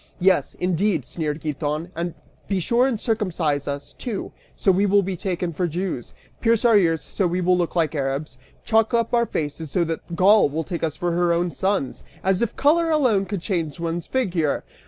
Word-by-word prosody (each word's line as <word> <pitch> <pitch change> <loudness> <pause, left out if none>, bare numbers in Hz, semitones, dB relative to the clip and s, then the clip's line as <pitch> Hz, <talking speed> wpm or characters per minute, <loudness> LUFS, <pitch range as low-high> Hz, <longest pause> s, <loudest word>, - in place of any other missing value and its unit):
"Yes, 185 0 +2
indeed," 180 - 0
sneered 155 -1 -3
Giton, 150 +2 -3
"and 170 0 -3 0.3
be 195 -2 0
sure 240 +8 +2
and 235 -5 -1
circumcise 175 - -1
us, 140 0 -5
too, 230 -6 -5 0.2
so 195 - +3
we 195 +2 +2
will 200 +1 +4
be 190 0 -3
taken 180 -1 -3
for 180 +3 0
Jews, 170 -6 -4 0.3
pierce 230 0 +2
our 230 -2 +6
ears 165 -5 +3
so 195 - 0
we 175 +1 -1
will 180 0 +3
look 175 -1 -1
like 160 -3 +1
Arabs, 135 -2 -3 0.2
chalk 225 +1 +2
our 235 0 +2
faces 155 +1 -3
so 175 +4 +1
that 165 +1 -4
Gaul 200 0 +5
will 160 +3 -2
take 170 0 -5
us 155 -3 -1
for 175 0 -1
her 175 0 +2
own 170 +1 +1
sons; 190 -8 -1 0.2
as 190 -1 +2
if 235 - -1
color 330 +4 +3
alone 250 -11 +3
could 200 -5 -3
change 170 -5 -2
one's 170 0 -3
figure! 180 - 0
180 Hz, 195 wpm, -23 LUFS, 160-205 Hz, 0.3 s, our